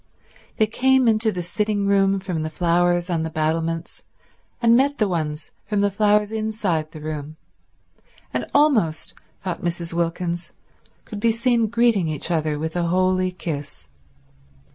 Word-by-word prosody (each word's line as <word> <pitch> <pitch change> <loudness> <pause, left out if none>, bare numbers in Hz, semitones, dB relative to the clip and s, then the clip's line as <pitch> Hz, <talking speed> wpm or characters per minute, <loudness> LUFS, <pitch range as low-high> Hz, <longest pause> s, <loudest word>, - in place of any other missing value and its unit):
They 215 - +4
came 260 +3 +3
into 220 0 +3
the 180 -3 -4
sitting 205 +2 -1
room 195 0 +3
from 185 -4 -3
the 155 - -2
flowers 175 +2 +1
on 170 -3 -1
the 160 - -2
battlements, 165 +1 -2 0.6
and 230 -1 +5
met 280 +3 +2
the 215 - +2
ones 155 -4 -3 0.2
from 205 -1 0
the 205 0 +2
flowers 210 +1 +2
inside 215 -8 -1
the 155 -3 -10
room, 155 0 -6 1.0
and - - -2
almost, 220 - +2 0.3
thought 185 -2 -4
Mrs. 170 -1 -3
Wilkins, 170 +1 -2 0.5
could 210 - -7
be 230 +2 +3
seen 230 0 +2
greeting 230 -5 +2
each 155 +2 -3
other 155 -2 0
with 160 +2 -4
a 175 -1 0
holy 185 +1 +2
kiss. 145 - -6
180 Hz, 150 wpm, -22 LUFS, 165-215 Hz, 1.0 s, and